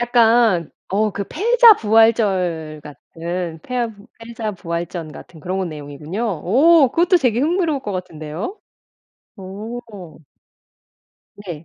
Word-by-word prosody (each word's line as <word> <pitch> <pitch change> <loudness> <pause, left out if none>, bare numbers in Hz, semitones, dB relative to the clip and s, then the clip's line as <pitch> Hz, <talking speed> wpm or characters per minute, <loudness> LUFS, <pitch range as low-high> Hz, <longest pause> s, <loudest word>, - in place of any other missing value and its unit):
약간 230 -7 +3 0.2
어 210 +2 0
그 200 - -4
패자부활절 220 - +3
같은 165 +4 -6
패 - - -21
패하부 230 -4 -4
패자부활전 180 -8 -5
같은 160 +1 -13
그런 185 +3 -3
내용이군요. 150 +6 -7
어 260 - +4
그것도 350 +5 +3
되게 245 -6 +1
흥미로울 320 -1 0
것 205 - -4
같은데요? 180 - -6 0.8
오 205 +5 -7 1.7
네. 165 -3 -7
205 Hz, 235 characters per minute, -19 LUFS, 170-240 Hz, 1.7 s, 어